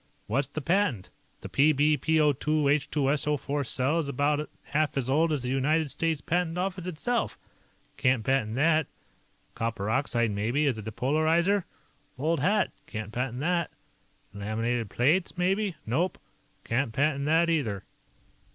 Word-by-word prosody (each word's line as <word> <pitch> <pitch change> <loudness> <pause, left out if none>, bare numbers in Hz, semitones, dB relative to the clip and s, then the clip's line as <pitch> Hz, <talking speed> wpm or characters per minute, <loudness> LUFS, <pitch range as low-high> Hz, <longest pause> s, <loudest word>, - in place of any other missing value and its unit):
"What's 135 +5 0
to 155 +2 -5
patent? 165 - 0 0.3
The - - -6
Pb 150 +1 +3
PbO_2 155 -2 +3
H_2SO_4 145 -1 +1
cell 135 +8 +1
is 155 - -2
about 145 +2 0
half 150 0 -1
as 130 -3 0
old 155 +5 +2
as 145 -4 -1
the 125 - -2
United 145 +3 +1
States 165 -3 -1
Patent 175 +1 -1
Office 185 -1 -2
itself. 230 +8 -1 0.6
Can't 125 -3 +2
patent 125 -4 0
that. 155 +2 +3 0.7
Copper 110 -2 -2
oxide, 120 -3 +1
maybe, 115 +9 0
as 130 -6 0
a - - -4
depolarizer? 155 - +1 0.5
Old 155 +4 0
hat; 205 +9 +2 0.2
can't 110 -2 -6
patent 125 +2 -3
that. 170 0 0 0.6
Laminated 110 +2 -2
plates, 165 +10 +1
maybe? 190 +1 +1
Nope. 160 +11 0 0.5
Can't 120 +1 0
patent 140 +1 +1
that, 165 +3 +3
either." 120 -13 0
145 Hz, 135 wpm, -28 LUFS, 125-160 Hz, 0.7 s, Pb